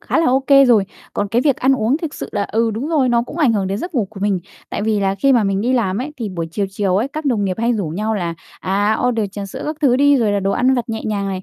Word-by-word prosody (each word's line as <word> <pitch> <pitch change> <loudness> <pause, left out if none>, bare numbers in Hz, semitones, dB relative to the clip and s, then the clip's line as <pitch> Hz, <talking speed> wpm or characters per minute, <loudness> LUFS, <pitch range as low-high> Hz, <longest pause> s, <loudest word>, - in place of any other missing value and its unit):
khá - - -1
là 330 - +3
OK 265 +2 +1 0.2
rồi, 220 -5 +4 0.3
còn 205 0 -2
cái 235 +4 +1
việc 280 -2 +2
ăn 265 +1 +2
uống 255 +2 +1
thực 325 -4 -5
sự - - -6
là, - - 0
ừ, 225 +1 0
đúng 235 +8 -4
rồi, 290 -6 +2
nó 235 -1 +2
cũng 295 - -9
ảnh 285 -9 +3
hưởng 200 -3 0
đến 195 +2 -2
giấc 350 +2 -6
ngủ 230 -5 +1
của 200 -3 -11
mình. 200 -2 +1 0.3
Tại - - -3
vì 215 -1 +1
là 195 0 +1
khi 270 +8 +2
mà 235 -5 +3
mình 195 0 0
đi 245 +4 0
làm 205 -6 0
ấy, 280 +5 -4
thì 230 -5 -4
buổi 170 -3 -4
chiều, 200 +4 -1
chiều 195 -1 0
ấy, 235 +7 0
các 310 +1 -6
đồng 225 -7 +1
nghiệp 185 -2 -1
hay 235 +1 +1
rủ 205 -6 -2
nhau 210 +7 -2
là, 175 -5 -2 0.3
à, 205 +3 +1
order 225 -4 0
trà 200 -1 -5
sữa 195 - -7
các 305 0 -3
thứ 260 -5 +4
đi, 285 +1 +4
rồi 225 -5 +1
là 200 - 0
đồ 195 - 0
ăn 260 +4 +2
vặt 245 -1 -2
nhẹ 220 -1 -4
nhàng 200 -2 -2
này, 190 -1 -4
220 Hz, 315 wpm, -19 LUFS, 200-255 Hz, 0.3 s, rồi